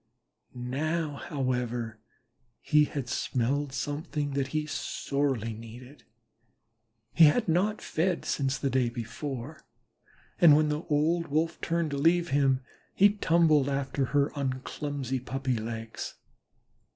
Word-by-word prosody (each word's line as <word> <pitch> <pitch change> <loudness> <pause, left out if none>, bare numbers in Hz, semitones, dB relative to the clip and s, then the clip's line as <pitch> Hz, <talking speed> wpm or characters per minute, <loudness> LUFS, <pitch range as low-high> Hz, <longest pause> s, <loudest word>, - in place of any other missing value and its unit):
Now, 145 +5 -2
however, 125 -6 -2 0.6
he 150 -1 +4
had 140 -4 -5
smelled 135 +4 -1
something 145 +2 -3
that 135 -1 -1
he 155 +2 -2
sorely 140 -6 -2
needed. 120 +5 -12 1.1
He 165 - +8
had 215 +10 +3
not 190 +6 +1
fed 175 +2 -1
since 135 -1 0
the 135 -1 -1
day 125 -2 +2
before, 125 +4 -6 0.8
and 160 -4 +8
when 155 0 +3
the 150 +1 -1
old 165 +3 +1
Wolf 160 +3 -1
turned 165 -2 0
to 140 - -2
leave 170 +3 +3
him, 135 -2 +2 0.3
he 200 +1 +7
tumbled 165 -8 +3
after 135 0 -1
her 140 +2 +1
on 130 -2 -2
clumsy 135 -3 -3
puppy 130 0 -2
legs. 115 0 -5
140 Hz, 125 wpm, -28 LUFS, 130-155 Hz, 1.1 s, He